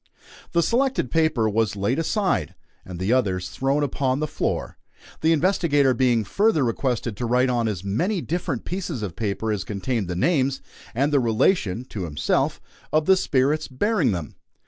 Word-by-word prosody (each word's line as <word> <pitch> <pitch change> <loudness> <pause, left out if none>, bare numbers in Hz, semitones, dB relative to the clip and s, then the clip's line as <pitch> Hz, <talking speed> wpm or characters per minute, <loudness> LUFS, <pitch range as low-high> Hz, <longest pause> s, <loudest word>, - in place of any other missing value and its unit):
The 170 -1 +3
selected 250 - +1
paper 155 -8 +2
was 110 -1 0
laid 105 +9 0
aside, 190 +4 0 0.3
and 90 -2 -8
the 95 +6 +1
others 95 -8 0
thrown 140 +2 0
upon 135 -1 0
the 155 - 0
floor, 150 - -3 0.5
the 160 - +3
investigator 155 -5 +3
being 120 -2 +2
further 200 - +2
requested 120 -1 -1
to 120 - -2
write 125 +2 +2
on 120 -2 +1
as 100 -4 -3
many 175 - 0
different 165 -7 -3
pieces 170 - -4
of 90 -6 -5
paper 110 0 -2
as 105 -3 -2
contained 105 0 -2
the 90 - -3
names, 135 - +1 0.4
and 140 +4 +1
the 140 - +5
relation 115 - +1
(to 95 -4 -4
himself) 75 -3 0 0.3
of 155 0 +2
the 190 - +6
spirits 150 -2 +1
bearing 170 - +1
them. 85 -5 -4
130 Hz, 170 wpm, -23 LUFS, 110-155 Hz, 0.5 s, the